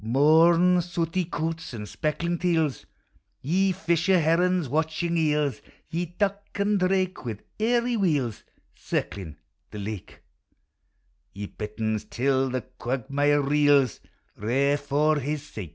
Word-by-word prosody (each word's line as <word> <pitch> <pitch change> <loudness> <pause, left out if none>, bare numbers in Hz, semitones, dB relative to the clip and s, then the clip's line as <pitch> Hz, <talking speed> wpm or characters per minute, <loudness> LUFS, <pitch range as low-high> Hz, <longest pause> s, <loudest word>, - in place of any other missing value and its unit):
Mourn, 165 +8 +5
sooty 175 +1 -2
coots, 165 -3 -4
and 105 -2 -6
speckled 170 +7 -2
teals, 160 -6 0 0.5
Ye 190 +7 +1
fisher 175 0 +2
herons, 170 +1 +2
watching 160 +4 -1
eels; 150 -3 +1 0.3
Ye 175 +1 -2
duck 200 0 0
and 205 0 +1
drake, 185 0 0
wi' 115 -4 -4 0.2
airy 240 +2 +2
wheels 150 - 0 0.3
Circling 90 -7 -4 0.3
the 105 - -9
lake; 105 -1 -7 1.1
Ye 100 +1 -5
bitterns, 110 +1 -4
till 135 +1 +1
the 130 0 -2 0.2
quagmire 140 +4 +1
reels, 145 -3 +3 0.4
Kair 135 +7 +1
for 145 +2 +1
his 145 +1 -3
sake. 105 - -8
150 Hz, 120 wpm, -26 LUFS, 130-175 Hz, 1.1 s, Mourn